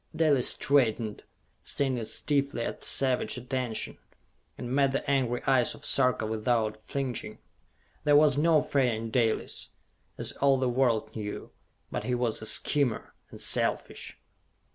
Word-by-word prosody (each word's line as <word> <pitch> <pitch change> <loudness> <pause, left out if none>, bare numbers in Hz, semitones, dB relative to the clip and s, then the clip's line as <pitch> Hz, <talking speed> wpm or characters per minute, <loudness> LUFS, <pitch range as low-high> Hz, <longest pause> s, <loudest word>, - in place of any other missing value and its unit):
Dalis 145 -6 +4
straightened, 115 -6 +1 0.4
standing 130 -4 -1
stiffly 140 -1 -1
at - - -5
savage 130 -1 +1
attention, 125 -2 -4 0.6
and 125 +1 -5
met 135 -1 +2
the 140 - -2
angry 130 -4 0
eyes 130 -3 +2
of - - -12
Sarka 125 -4 +2
without 110 0 0
flinching. 125 +3 -5 0.7
There 145 -1 +4
was 145 -2 +5
no 155 +1 +3
fear 130 -4 +1
in 110 +1 -6
Dalis, 115 -3 -1 0.5
as - - -1
all 135 -1 +2
the 130 0 0
world 120 -3 0
knew. 105 -2 -6 0.4
But - - -4
he 125 - 0
was 120 -3 -2
a 110 - -2
schemer, 140 -3 +2 0.2
and - - -12
selfish. - - -1
125 Hz, 140 wpm, -28 LUFS, 115-140 Hz, 0.7 s, was